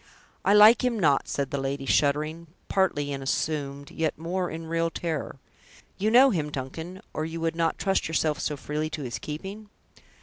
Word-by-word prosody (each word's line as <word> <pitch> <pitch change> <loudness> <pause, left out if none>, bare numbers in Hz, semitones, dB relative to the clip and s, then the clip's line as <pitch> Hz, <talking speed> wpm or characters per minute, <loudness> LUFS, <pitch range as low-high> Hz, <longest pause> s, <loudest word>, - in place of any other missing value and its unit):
"I 200 - +4
like 215 +4 +8
him 250 -2 +1
not," 145 -6 +3
said 140 -1 -2
the 140 - -1
lady, 135 0 -3
shuddering, 155 +4 +1 0.2
partly 145 -7 +1
in 135 - -4
assumed, 140 0 -2
yet 160 -2 -1
more 175 +3 -2
in 165 +1 -6
real 165 +1 0
terror. 160 -4 -4 0.6
"You 210 +3 +2
know 255 +4 +7
him, 155 -7 -1
Duncan, 160 +8 -6
or 155 - -2
you 165 +1 -4
would 165 0 -1
not 165 -1 0
trust 195 -1 0
yourself 155 -2 0
so 150 - -2
freely 150 +3 -3
to 155 -2 -5
his 120 -2 -4
keeping?" 195 +8 -7
160 Hz, 180 wpm, -26 LUFS, 145-180 Hz, 0.6 s, like